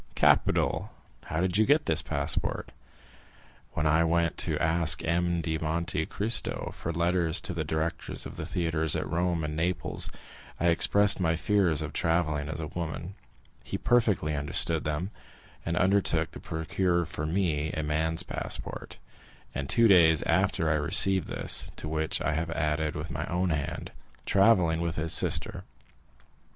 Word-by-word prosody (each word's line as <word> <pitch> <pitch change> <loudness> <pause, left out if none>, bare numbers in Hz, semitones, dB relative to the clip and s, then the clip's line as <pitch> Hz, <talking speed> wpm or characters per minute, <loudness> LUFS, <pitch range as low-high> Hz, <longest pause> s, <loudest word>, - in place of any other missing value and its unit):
"Capital! - - +2 0.3
How 80 +2 -2
did 95 +2 +1
you 110 - +5
get 150 +3 +3
this 80 -2 +2
passport?" 75 -1 -1 1.0
"When 75 - -2
I 80 +2 +3
went 85 0 +1
to - - -1
ask 80 -1 +2
M. 85 +1 0
de 80 -1 -2
Monte 80 0 -2
Cristo 110 +3 -1
for 85 - -4
letters 85 0 +1
to 90 - -3
the 80 -2 -2
directors 80 +1 -2
of - - -8
the - - -6
theatres 80 -3 -1
at - - -2
Rome 85 +1 -1
and 75 0 -3
Naples, 85 +2 -1 0.5
I 85 - +2
expressed 100 +5 +4
my 80 -3 +1
fears 90 -4 +1
of 75 -2 -6
travelling 80 -3 0
as 80 - -4
a 80 - -3
woman; 85 +2 -5 0.5
he - - -4
perfectly 105 -11 +1
understood 80 +2 +1
them, 75 +6 -2 0.5
and 85 +1 -2
undertook 90 -4 +2
to - - -10
procure 85 +2 -1
for 75 0 -5
me 80 -4 -1
a 80 - -2
man's 80 +3 0
passport, - - -4 0.6
and 65 0 -4
two 115 -1 +4
days 85 -6 +5
after 80 - +1
I 80 - +2
received 95 +5 +4
this, - - 0
to - - -5
which 80 0 -1
I 80 - 0
have 80 +2 -2
added 75 -1 -1
with 80 +2 -5
my 80 +1 -4
own 90 0 -1
hand, 75 0 -4 0.3
'travelling 95 -5 +3
with 85 -2 -2
his 80 +1 0
sister. - - +1
80 Hz, 160 wpm, -28 LUFS, 80-90 Hz, 1.0 s, you